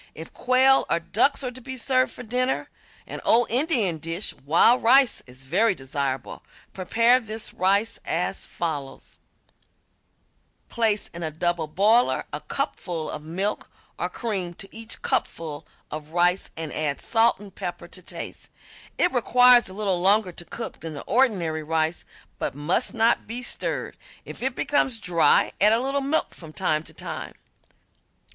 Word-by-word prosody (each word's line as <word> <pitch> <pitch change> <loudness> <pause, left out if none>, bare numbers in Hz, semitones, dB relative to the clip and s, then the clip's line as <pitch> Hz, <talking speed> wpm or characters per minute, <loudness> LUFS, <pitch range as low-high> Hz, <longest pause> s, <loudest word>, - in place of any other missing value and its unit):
If 160 - -9
quail 260 +2 +4
or - - +2
ducks 235 +12 +1
are 250 - -2
to 255 +1 -11
be 260 +1 -6
served 255 +1 +2
for 250 - -10
dinner, 250 +3 -1 0.4
an - - -7
old 240 +1 +3
Indian 240 - +2
dish, 165 +5 -2
wild 170 - +3
rice, 260 +2 +5
is 125 +1 -11
very 190 +9 +2
desirable. 135 -2 -4 0.3
Prepare 230 +6 +3
this 220 -1 -6
rice 200 +4 +1
as - - -2
follows: 150 -5 -5 1.5
Place 220 -3 +1
in 170 - -7
a 160 - -2
double 165 +1 -1
boiler 210 +10 +3
a - - -2
cupful 165 -4 -3
of - - -6
milk 185 +7 -3 0.3
or - - -1
cream 190 -7 -4
to 195 +2 -11
each 225 0 -7
cupful 155 -2 -2 0.2
of 155 0 -6
rice 175 +3 +1
and 160 -2 -5
add 150 -2 -1
salt 230 0 +2
and 200 -1 -12
pepper - - -6
to - - -8
taste. - - -8 0.5
It 355 - +3
requires 245 -2 +5
a - - -10
little 195 -4 -1
longer 195 0 +3
to 175 - -9
cook 230 +4 -7
than 160 -2 -7
the 140 - -7
ordinary 195 -10 +1
rice, 160 +1 -1 0.3
but - - -3
must 170 - 0
not 230 +1 +2
be 240 +3 -4
stirred. - - -1 0.3
If - - -10
it 260 0 -1
becomes 265 -5 +1
dry 170 -6 +3
add 210 +2 +6
a 225 - +3
little 275 +2 -1
milk 280 +4 0
from 160 -3 -12
time 155 +1 0
to - - -11
time. - - -6
200 Hz, 160 wpm, -24 LUFS, 160-240 Hz, 1.5 s, add